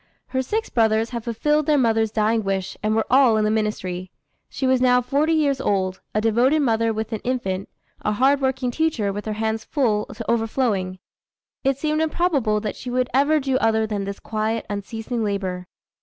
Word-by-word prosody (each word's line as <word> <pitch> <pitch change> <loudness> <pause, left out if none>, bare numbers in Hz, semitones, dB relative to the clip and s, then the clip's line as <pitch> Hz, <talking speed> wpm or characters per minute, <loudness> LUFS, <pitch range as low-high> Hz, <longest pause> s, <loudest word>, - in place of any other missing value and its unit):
Her 260 - 0
six 430 - -2
brothers 225 0 +2
had 235 -2 -4
fulfilled 295 +6 0
their 300 -1 +4
mother's 225 -3 +2
dying 220 +1 +1
wish, 195 -1 -2
and 215 +1 +1
were 220 - +1
all 255 -4 +5
in 215 - +2
the 215 - +2
ministry. 185 -4 -2 0.4
She 270 - -3
was 260 -1 +3
now 250 -1 +5
forty 285 +6 +1
years 285 -4 +1
old, 190 -5 0
a - - +3
devoted 240 +7 +3
mother, 230 -3 +2
with 220 +1 -4
an 220 - -2
infant; 195 -7 -2 0.3
a 210 - 0
hard 270 +6 +3
working 265 -1 0
teacher, 240 -9 0
with 205 +2 -6
her 215 - -1
hands 220 +1 -2
full 220 -8 0
to 225 +1 -8
overflowing. 225 -5 0 0.7
It 270 -1 +1
seemed 305 +2 0
improbable 305 -9 +1
that 210 -1 -3
she 250 - -7
would 250 0 0
ever 285 +4 +3
do 265 -2 0
other 220 -2 +2
than 205 -2 -3
this 200 0 -5
quiet, 220 +1 -2
unceasing 225 +3 -4
labor. 190 -3 -3
225 Hz, 190 wpm, -22 LUFS, 210-265 Hz, 0.7 s, all